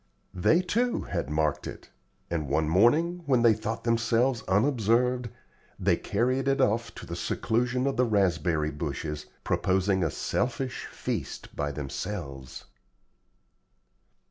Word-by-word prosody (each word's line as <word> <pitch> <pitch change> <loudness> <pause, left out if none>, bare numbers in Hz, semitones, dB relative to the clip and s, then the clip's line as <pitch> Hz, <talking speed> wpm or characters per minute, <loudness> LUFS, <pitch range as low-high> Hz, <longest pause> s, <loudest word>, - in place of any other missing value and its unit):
They, 160 - +3
too, 235 +7 0
had 65 - -3
marked 75 -1 0
it; - - -9 0.4
and 80 -5 -2
one 80 +2 +1
morning, 150 - +3
when 125 -4 +3
they 115 -2 +7
thought 110 +1 -4
themselves 115 +1 +2
unobserved, 120 +3 +2 0.5
they - - +2
carried 130 +5 0
it 135 0 +2
off 115 -2 +1
to - - -8
the - - -5
seclusion 125 +3 0
of 135 -2 0
the 125 - +4
raspberry 85 -7 +1
bushes, 75 0 -4 0.2
proposing 95 0 +1
a 80 - +1
selfish 125 - -2
feast - - -5
by 75 0 -1
themselves. 70 -3 -6
110 Hz, 125 wpm, -28 LUFS, 80-125 Hz, 0.5 s, they